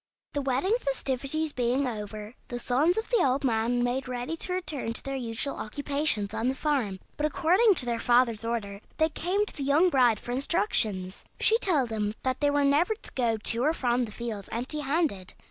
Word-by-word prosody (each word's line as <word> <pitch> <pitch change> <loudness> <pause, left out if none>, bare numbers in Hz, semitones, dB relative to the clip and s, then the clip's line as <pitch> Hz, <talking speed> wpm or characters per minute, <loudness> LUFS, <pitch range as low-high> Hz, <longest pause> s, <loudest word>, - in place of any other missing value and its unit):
The 285 - -1
wedding 275 - 0
festivities 275 - -1
being 255 +2 +1
over, 210 -1 -6
the 245 - -4
sons 280 - +1
of 445 - -2
the 470 -6 +4
old 265 +1 +1
man 240 0 +1
made 250 +2 -1
ready 250 +5 -3
to 360 +2 -1
return 305 -10 -2
to - - -3
their 275 0 -3
usual 240 +2 -3
occupations 280 -3 -1
on 230 - -1
the 260 - 0
farm; 255 -10 -1 0.2
but, 300 - +1
according 365 - +3
to 255 - +3
their 235 -1 -1
father's 240 -2 +3
order, 210 -4 -3 0.2
they 315 0 +3
came 370 +6 0
to - - -5
the 290 - -6
young 305 +6 +3
bride 245 -6 +4
for 240 - -7
instructions. 220 - 0 0.2
She 450 +1 +4
told 300 - +2
them 210 -1 -2
that 260 -1 -1
they 290 - +2
were 285 0 +2
never 310 +10 +3
to 440 - -11
go 235 -3 +1
to 230 +3 +2
or 310 +3 +2
from 245 -3 +1
the 215 - -10
fields 215 -3 -6
empty 250 +7 -3
handed. 280 - -1
260 Hz, 200 wpm, -27 LUFS, 230-300 Hz, 0.2 s, the